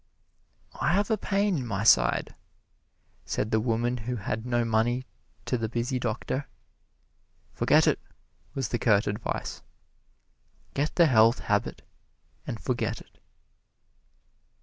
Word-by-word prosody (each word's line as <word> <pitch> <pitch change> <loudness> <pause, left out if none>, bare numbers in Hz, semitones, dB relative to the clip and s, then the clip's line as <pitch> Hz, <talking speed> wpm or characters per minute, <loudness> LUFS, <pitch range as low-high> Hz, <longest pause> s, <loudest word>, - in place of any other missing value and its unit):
"I 170 - +2
have 205 +3 +1
a - - +4
pain 200 -2 +1
in 125 - -5
my 100 -2 -2
side," 60 - +4 0.9
said 105 - -2
the 110 - +3
woman 120 +2 0
who 125 +2 -4
had 110 +2 -4
no 120 -1 +1
money 115 +3 +1 0.4
to 125 - -1
the 110 -1 -2
busy 120 +3 -1
doctor. 125 +4 -3 1.1
"Forget - - +4
it," - - +2 0.6
was 135 -6 -2
the 120 - -1
curt 105 -3 +3
advice. 105 +2 -4 1.1
Get 150 +2 -1
the 170 - +6
Health 115 -4 +5
Habit, - - -1 0.6
and - - -4
forget - - -2
it. - - -19
120 Hz, 125 wpm, -27 LUFS, 110-130 Hz, 1.1 s, the